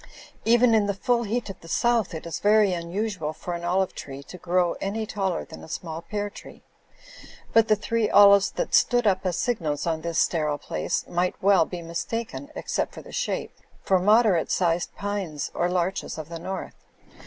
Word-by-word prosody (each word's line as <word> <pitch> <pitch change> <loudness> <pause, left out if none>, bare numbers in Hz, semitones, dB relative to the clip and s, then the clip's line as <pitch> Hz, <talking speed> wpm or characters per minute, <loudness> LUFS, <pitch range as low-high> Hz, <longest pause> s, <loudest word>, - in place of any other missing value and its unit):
Even 235 +1 +5
in 215 -2 +3
the 200 - -1
full 235 +4 +1
heat 230 +3 -2
of 190 - -13
the 165 - -14
South 230 0 +1
it 160 - -7
is 170 - -4
very 210 -2 +4
unusual 175 -1 -3
for 175 +2 -6
an 170 0 -5
olive 185 +2 +1
tree 140 0 -8
to 180 - -11
grow 175 0 +1
any 215 +3 -2
taller 195 -5 -2
than 80 - -11
a - - -10
small 165 -1 -5
pear 205 +4 -3
tree; 205 - -12 0.9
but 225 -1 +5
the 215 - +5
three 215 +1 -1
olives 200 -1 +7
that - - -4
stood 245 -1 +4
up 190 -2 +2
as 175 - -1
signals 160 -12 -1
on 160 -2 -1
this 170 0 -3
sterile 150 -3 +1
place - - -3
might 175 +1 0
well 195 -3 +4
be 175 0 -7
mistaken, 230 - -4
except - - -2
for - - -9
the - - -12
shape, - - -3 0.3
for 190 -1 +3
moderate 210 -2 +4
sized 170 -1 +1
pines 190 -7 -3
or 175 - 0
larches 180 0 -1
of 155 0 -7
the 165 -1 -6
north. 190 +3 -5
185 Hz, 190 wpm, -25 LUFS, 170-210 Hz, 0.9 s, olives